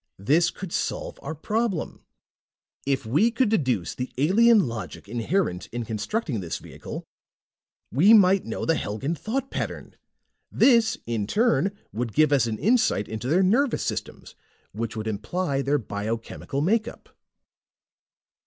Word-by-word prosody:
"This 155 - +3
could 180 -1 -8
solve - - -3
our 155 +3 -5
problem. 215 +2 -2 0.8
If 135 -2 0
we 150 - +3
could 235 0 +1
deduce 130 - 0
the 125 0 -5
alien 210 - +5
logic 115 -3 -7
inherent 115 - -1
in 120 0 -5
constructing 115 - -2
this 85 -4 -4
vehicle, - - -8 0.9
we 170 - +5
might 195 -3 +6
know - - -4
the 165 - +3
Helgan 135 +3 -2
thought 255 - -3
pattern. - - -5 0.6
This, 230 -4 +4
in 115 -3 -2
turn, 205 - +1 0.2
would 115 -1 -3
give 155 -1 +4
us 130 -4 +3
an 110 -1 -2
insight 220 - +2
into 110 +2 -5
their 175 +7 +3
nervous 240 +8 +2
systems, - - -5 0.4
which 115 +2 -4
would 110 -1 -4
imply 135 - -2
their 140 +2 +1
biochemical 115 +4 -4
makeup." 220 +8 -1
150 Hz, 135 wpm, -25 LUFS, -, 0.9 s, might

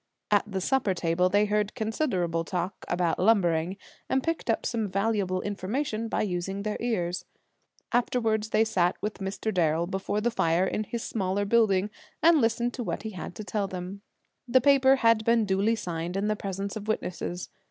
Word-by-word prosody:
At 210 0 +2
the 190 -1 -2
supper 215 -3 +1
table 170 +1 +1
they 205 +2 +3
heard 210 0 0
considerable 190 - -1
talk 180 +2 -4
about 175 -2 0
lumbering, 180 -3 +2 0.3
and 265 0 +1
picked 330 -6 -2
up 225 - +1
some 225 -3 -1
valuable 195 -2 0
information 215 +3 -2
by - - 0
using 195 +1 -3
their 210 0 -2
ears. 180 -7 -1 0.7
Afterward 225 -3 +1
they 220 0 +2
sat 180 -5 +1
with 210 0 -3
Mr. 200 +3 -3
Darrel 165 -1 +2
before 190 +3 -2
the 240 +3 0
fire 170 -4 +2
in 215 +2 -2
his 235 +2 -4
smaller 200 -1 -1
building, 205 -2 +3 0.3
and 325 -2 +6
listened 235 +1 +1
to 245 - -4
what - - -3
he 220 - -4
had 180 -2 -7
to 215 - -6
tell 205 -1 -2
them. 185 +2 -6 0.5
The 255 +2 +5
paper 270 0 +5
had 230 -4 +3
been 230 -1 +3
duly 200 +3 +2
signed 175 -3 -4
in 205 +2 0
the 215 - +1
presence 195 0 -4
of 215 -1 -6
witnesses. 180 -4 -3
205 Hz, 180 wpm, -27 LUFS, 185-225 Hz, 0.7 s, and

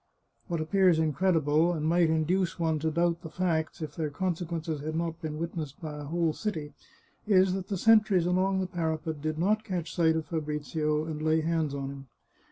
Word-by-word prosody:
What 170 -2 -2
appears 180 +1 +3
incredible, 160 0 +2
and 155 -2 -2
might 170 0 +3
induce 170 +3 +1
one 160 -2 0
to 160 +2 0
doubt 170 +1 +1
the 160 - -8
facts, 165 -2 -1
if 150 -2 -6
their 155 -2 -2
consequences 165 -2 -3
had 155 +2 -4
not 165 0 -2
been 155 -2 -4
witnessed 160 -3 -5
by 150 -2 -6
a 145 - -6
whole 165 +1 0
city, 155 -9 -4 0.5
is 190 -2 +4
that 190 -1 -4
the 200 - -2
sentries 215 -3 +4
along 190 +2 +1
the - - 0
parapet 160 -3 -3
did 155 0 -2
not 210 +6 +1
catch 175 -5 -4
sight 160 -2 +3
of 160 -1 -2
Fabrizio 150 -1 -2
and 155 -1 -5
lay 160 +1 +2
hands 160 -3 0
on 135 -1 -4
him. 135 -1 -10
160 Hz, 190 wpm, -29 LUFS, 155-180 Hz, 0.5 s, is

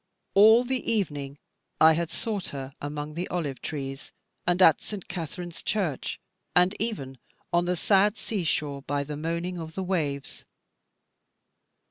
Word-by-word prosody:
All 220 +4 +7
the 255 0 -1
evening 145 -10 -2 0.4
I 160 0 +8
had 170 0 -1
sought 205 +1 -1
her 135 -1 -6
among 145 +1 -4
the 175 +3 -3
olive 145 -8 -3
trees, 135 -2 -5 0.4
and 175 0 +3
at 165 -5 +7
St. 205 -4 -6
Katharine's 175 0 -5
Church, 180 -11 -1 0.4
and 180 +2 +6
even 140 - -3 0.3
on 175 0 +3
the 180 +1 +1
sad 200 +4 +3
sea 200 -2 -2
shore 145 -3 -1
by 145 0 -1
the 150 +1 -5
moaning 170 +3 -3
of 160 -1 -7
the 190 - -2
waves. 150 -7 -2
170 Hz, 145 wpm, -27 LUFS, 145-190 Hz, 0.4 s, I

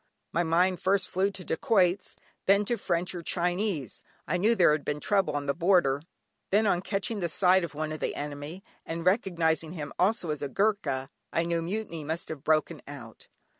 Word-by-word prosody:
My 170 - +1
mind 175 +2 +2
first 190 0 +2
flew 190 +2 +1
to 195 -2 -8
dacoits, 185 +1 +1 0.3
then 200 +2 +5
to 240 - +1
French 180 -4 -1
or 175 - -5
Chinese 175 - -1 0.3
(I 180 - +1
knew 215 +6 +3
there 175 -7 +5
had 150 -1 0
been 145 0 -2
trouble 195 -3 +1
on 145 0 -2
the 140 - +1
border), 170 -6 +3 0.5
then, 210 +3 +3
on 180 -4 +2
catching 200 +2 -2
sight 185 +2 +4
of 160 -3 -5
one 155 +1 -3
of 155 - -5
the - - -2
enemy, 145 +5 -6 0.2
and 165 +1 -5
recognising 170 -5 +1
him 150 -5 -6
also 185 -3 +2
as 150 - -4
a 145 - -3
Goorkha, 195 -9 0 0.2
I 165 - +1
knew 170 0 0
mutiny 170 -2 -4
must 160 +3 -4
have 155 -4 -6
broken 155 -1 +1
out. - - -10
175 Hz, 190 wpm, -28 LUFS, 155-195 Hz, 0.5 s, then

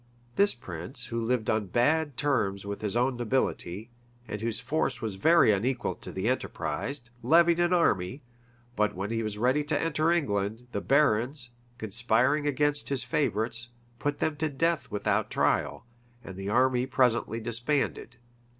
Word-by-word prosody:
This 200 -7 +5
prince, 105 - -7
who 115 0 -3
lived 115 -1 0
on 110 -2 0
bad 145 - +1
terms 105 -10 0
with 100 0 -5
his 105 +1 -1
own 125 +1 +1
nobility, 115 -4 -2 0.4
and 105 -1 -5
whose 115 -1 -2
force 135 0 -1
was 110 -4 -3
very 160 - +5
unequal 120 +5 0
to - - -10
the 95 +3 -3
enterprise, 130 +1 -2 0.2
levied 170 +6 +4
an 175 0 +2
army; 130 - +1 0.5
but 105 -1 +1
when 100 +4 -4
he 115 0 -1
was 110 -2 -4
ready 130 +6 +2
to 145 0 0
enter 165 0 +1
England, 110 -8 -1
the - - -3
barons, 130 -2 +2 0.3
conspiring 120 +6 +1
against 145 +1 0
his 135 -3 0
favorites, 120 -2 -1 0.3
put 145 0 -1
them 155 -2 -1
to 155 +1 0
death 165 +3 0
without 105 0 0
trial; - - 0 0.4
and 95 - -9
the 95 +1 -5
army 125 +2 +2
presently 125 -4 +1
disbanded. 120 +4 -1
120 Hz, 155 wpm, -28 LUFS, 110-145 Hz, 0.5 s, This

